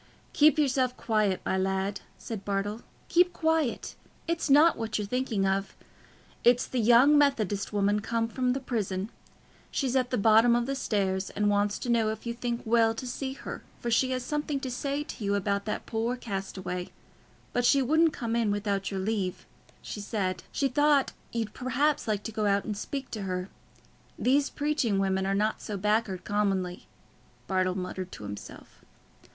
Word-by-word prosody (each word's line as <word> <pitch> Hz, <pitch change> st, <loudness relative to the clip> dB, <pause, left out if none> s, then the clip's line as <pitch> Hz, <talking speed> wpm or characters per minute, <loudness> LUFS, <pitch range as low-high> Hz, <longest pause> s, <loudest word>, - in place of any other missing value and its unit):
"Keep 305 Hz, +1 st, +5 dB
yourself 260 Hz, -4 st, +1 dB
quiet, 215 Hz, -4 st, +1 dB
my 190 Hz, -, +1 dB
lad," 190 Hz, +1 st, -1 dB, 0.2 s
said 220 Hz, -4 st, -6 dB
Bartle; 205 Hz, +3 st, -2 dB, 0.3 s
"keep 355 Hz, +1 st, +4 dB
quiet. 320 Hz, -5 st, 0 dB, 0.3 s
It's 335 Hz, -2 st, -1 dB
not 300 Hz, +4 st, +6 dB
what 225 Hz, -1 st, -2 dB
you're 210 Hz, -, -2 dB
thinking 230 Hz, -3 st, -1 dB
of. 195 Hz, +1 st, -1 dB, 0.7 s
It's 245 Hz, +1 st, +5 dB
the 255 Hz, -, -2 dB
young 240 Hz, +6 st, +6 dB
Methodist 215 Hz, -9 st, +1 dB
woman 205 Hz, 0 st, +2 dB
come 230 Hz, +1 st, -1 dB
from 250 Hz, +2 st, 0 dB
the 270 Hz, -, -2 dB
prison. 215 Hz, -5 st, -3 dB, 0.6 s
She's 265 Hz, -2 st, -1 dB
at 255 Hz, -1 st, +2 dB
the 250 Hz, -, 0 dB
bottom 225 Hz, +3 st, +5 dB
o' 240 Hz, -, +2 dB
the 275 Hz, -, -2 dB
stairs, 195 Hz, -7 st, -1 dB
and 205 Hz, 0 st, +1 dB
wants 205 Hz, 0 st, +1 dB
to 245 Hz, -, -5 dB
know 230 Hz, -2 st, +3 dB
if 220 Hz, +1 st, -5 dB
you 235 Hz, -, -2 dB
think 235 Hz, 0 st, -3 dB
well 225 Hz, 0 st, +3 dB
to 255 Hz, -, -6 dB
see 265 Hz, +2 st, -4 dB
her, -, -, -7 dB, 0.2 s
for 240 Hz, -, -3 dB
she 255 Hz, +3 st, +3 dB
has 255 Hz, -1 st, -1 dB
something 295 Hz, +1 st, -2 dB
to 260 Hz, -, -4 dB
say 280 Hz, +4 st, -2 dB
to 265 Hz, -, -8 dB
you 200 Hz, 0 st, +1 dB
about 200 Hz, 0 st, -1 dB
that 215 Hz, -, -3 dB
poor 230 Hz, +2 st, -1 dB
castaway; 190 Hz, -5 st, -4 dB, 0.6 s
but 245 Hz, -, +1 dB
she 275 Hz, +2 st, +4 dB
wouldn't 315 Hz, +5 st, +4 dB
come 230 Hz, -5 st, -3 dB
in 230 Hz, -3 st, +2 dB
without 200 Hz, -1 st, -1 dB
your 195 Hz, -, -3 dB
leave, 195 Hz, -3 st, -2 dB, 0.4 s
she -, -, -6 dB
said. 190 Hz, -4 st, -2 dB
She 275 Hz, -, +1 dB
thought 290 Hz, +1 st, +3 dB, 0.2 s
you'd 225 Hz, -2 st, -3 dB
perhaps 270 Hz, +3 st, 0 dB
like 210 Hz, -2 st, -1 dB
to 225 Hz, -, -5 dB
go 215 Hz, -1 st, 0 dB
out 200 Hz, 0 st, +2 dB
and 210 Hz, -, -3 dB
speak 270 Hz, +5 st, -5 dB
to 215 Hz, -, -4 dB
her. 185 Hz, 0 st, -3 dB, 0.7 s
These 275 Hz, +3 st, +2 dB
preaching 290 Hz, -8 st, 0 dB
women 190 Hz, 0 st, +1 dB
are 195 Hz, -, +1 dB
not 215 Hz, +2 st, 0 dB
so 210 Hz, -, -4 dB
back'ard 210 Hz, -2 st, 0 dB
commonly," 195 Hz, -3 st, -1 dB, 0.6 s
Bartle 185 Hz, -1 st, 0 dB
muttered 185 Hz, 0 st, -5 dB
to -, -, -9 dB
himself. 100 Hz, 0 st, -9 dB
225 Hz, 180 wpm, -28 LUFS, 200-255 Hz, 0.7 s, not